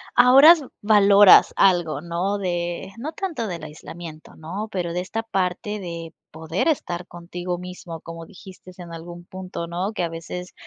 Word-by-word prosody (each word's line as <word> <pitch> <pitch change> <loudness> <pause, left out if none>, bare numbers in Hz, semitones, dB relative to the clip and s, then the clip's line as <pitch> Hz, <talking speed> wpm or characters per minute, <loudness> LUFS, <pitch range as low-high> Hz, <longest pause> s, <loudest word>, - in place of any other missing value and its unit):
ahora 260 +6 +8
s 315 -6 +2
valoras 205 -2 +7
algo, 175 -6 +3
¿no?, 175 +5 -2
de 175 0 -3
no 305 +6 -4
tanto 315 - -4
del 170 -4 -6
aislamiento, 155 +1 -10
¿no', 190 +7 -6
pero 175 -3 -3
de 180 - -1
esta 225 +5 -4
parte 195 0 -2
de 170 -3 -7 0.2
poder 160 - -3
estar 180 - -1
contigo 175 +1 -6
mismo 180 -2 -9
como 165 0 -9
dijiste 185 -2 -14
en 175 -2 -10
algún 175 +1 -9
punto, 185 -2 -7
¿no?, 180 +5 -3
que 180 - -2
a 170 - -1
veces, 180 +2 -7
180 Hz, 165 wpm, -23 LUFS, 170-200 Hz, 0.2 s, ahora